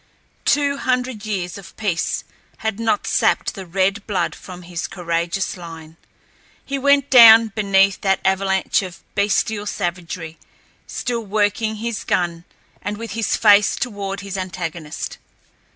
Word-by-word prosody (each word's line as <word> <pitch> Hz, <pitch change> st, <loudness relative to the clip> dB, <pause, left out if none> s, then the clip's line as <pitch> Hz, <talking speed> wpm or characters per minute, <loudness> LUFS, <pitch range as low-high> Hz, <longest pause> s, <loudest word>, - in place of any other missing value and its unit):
Two 285 Hz, -1 st, +2 dB
hundred 250 Hz, -5 st, -2 dB
years 190 Hz, -3 st, -3 dB
of 195 Hz, -, -14 dB
peace 195 Hz, -6 st, -1 dB, 0.4 s
had 220 Hz, -1 st, -1 dB
not 225 Hz, -2 st, 0 dB
sapped -, -, +1 dB
the 195 Hz, -5 st, -8 dB
red 195 Hz, +4 st, 0 dB
blood 185 Hz, -5 st, -1 dB
from 180 Hz, -1 st, -11 dB
his 175 Hz, -1 st, -5 dB
courageous 170 Hz, +1 st, -2 dB
line. 165 Hz, -3 st, -10 dB, 0.7 s
He 275 Hz, 0 st, -3 dB
went 280 Hz, 0 st, +3 dB
down 225 Hz, -3 st, +9 dB
beneath 195 Hz, -2 st, +2 dB
that 195 Hz, -1 st, +2 dB
avalanche 190 Hz, 0 st, +1 dB
of 185 Hz, -1 st, -9 dB
bestial 205 Hz, +1 st, 0 dB
savagery 175 Hz, -3 st, -4 dB, 0.5 s
still 235 Hz, -2 st, -3 dB
working 215 Hz, +1 st, 0 dB
his 225 Hz, -1 st, -4 dB
gun 170 Hz, -1 st, -1 dB, 0.4 s
and 205 Hz, 0 st, -4 dB
with 230 Hz, +1 st, -7 dB
his 225 Hz, -1 st, 0 dB
face 205 Hz, -2 st, +5 dB
toward 200 Hz, -4 st, -4 dB
his 200 Hz, -1 st, -5 dB
antagonist. 175 Hz, -4 st, -5 dB
200 Hz, 135 wpm, -20 LUFS, 180-220 Hz, 0.7 s, down